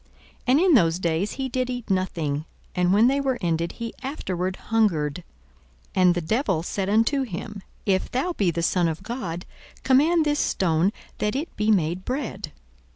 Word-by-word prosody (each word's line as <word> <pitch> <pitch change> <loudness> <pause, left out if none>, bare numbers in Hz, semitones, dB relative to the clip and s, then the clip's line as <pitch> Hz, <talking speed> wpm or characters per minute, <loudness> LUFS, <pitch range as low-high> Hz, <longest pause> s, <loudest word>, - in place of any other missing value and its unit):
And 260 +4 +5
in 365 0 +4
those 170 - +4
days 175 +3 -1
he 265 0 -3
did 255 0 -1
eat 245 -4 -4
nothing: 160 -6 -1 0.3
and 180 0 +2
when 210 +4 +5
they 275 +3 +3
were 265 -2 0
ended, 170 -1 -1
he 230 -1 -6
afterward 190 - -3
hungered. 180 -9 0 0.7
42:004:003 185 - +2
And 180 -1 +5
the 175 - -1
devil 190 - 0
said 195 +2 -2
unto 230 +7 +3
him, 210 -2 -5 0.2
If 190 -2 +1
thou 310 +8 -1
be 200 - +1
the 170 0 -2
Son 175 0 +2
of 160 -1 -4
God, 185 -8 -5 0.4
command 310 +5 +4
this 295 0 +1
stone 170 +1 +2 0.3
that 210 +2 0
it 295 +5 -4
be 215 +1 0
made 180 -3 +2
bread. 255 +1 -4
200 Hz, 175 wpm, -24 LUFS, 175-255 Hz, 0.7 s, And